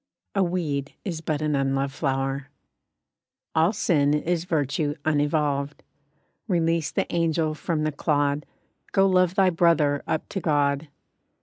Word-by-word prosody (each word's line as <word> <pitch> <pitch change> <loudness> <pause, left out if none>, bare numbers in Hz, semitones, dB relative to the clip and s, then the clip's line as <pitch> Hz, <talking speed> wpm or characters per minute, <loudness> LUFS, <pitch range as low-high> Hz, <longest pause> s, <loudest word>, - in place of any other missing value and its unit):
A 195 - +1
weed 155 -6 -2
is 170 -5 -3
but 155 -1 -2
an 150 -1 +1
unloved 135 0 0
flower! 135 -1 -2 1.0
All 160 +4 +3
sin 150 -8 +2
is 170 +2 -1
virtue 150 -2 0
unevolved, 145 -2 0 0.6
Release 165 -4 +1
the - - -1
angel 165 -2 +1
from 155 +1 -2
the 155 - 0
clod— 145 -1 0 0.5
Go 195 - +5
love 185 -1 +3
thy 190 -2 +4
brother 165 -4 +3
up 155 - -1
to 195 - -3
God. 145 -2 +1
155 Hz, 130 wpm, -25 LUFS, 145-170 Hz, 1.0 s, Go